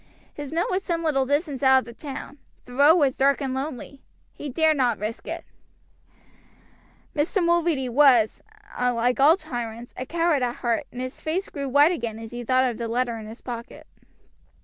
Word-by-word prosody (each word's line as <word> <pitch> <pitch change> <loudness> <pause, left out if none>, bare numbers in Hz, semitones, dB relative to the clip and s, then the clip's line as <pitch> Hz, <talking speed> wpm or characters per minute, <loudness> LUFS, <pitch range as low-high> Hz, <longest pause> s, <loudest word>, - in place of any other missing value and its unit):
His 290 -2 -7
mill 330 +2 0
was 370 +1 0
some 335 -3 -2
little 270 -5 +1
distance 290 -1 -1
out 265 -1 +6
of 260 - 0
the 235 - -10
town; 280 +2 -8 0.3
the 250 - -12
road 285 +5 +6
was 280 -6 +2
dark 275 +1 +3
and 270 -2 -3
lonely. 270 0 -5 0.3
He 295 - -7
dared 315 +3 +2
not 245 -5 +2
risk 215 +2 -5
it. - - -5 1.7
Mr. 340 +5 +1
Mulready 340 -6 +1
was, 245 -4 +4 0.4
like 245 0 +1
all 305 +6 +6
tyrants, 240 - -6
a 255 - -6
coward 335 -2 +1
at 245 -1 -1
heart, 235 -2 -1
and 250 - -6
his 255 +1 -6
face 360 +5 -2
grew 280 -2 -4
white 290 +5 +5
again 230 -10 -3
as 225 0 -9
he 240 0 -6
thought 255 +2 +3
of 240 -2 -4
the 235 - -2
letter 240 +1 -1
in 215 - -9
his 225 +2 -10
pocket. 235 -2 -8
265 Hz, 190 wpm, -24 LUFS, 240-300 Hz, 1.7 s, out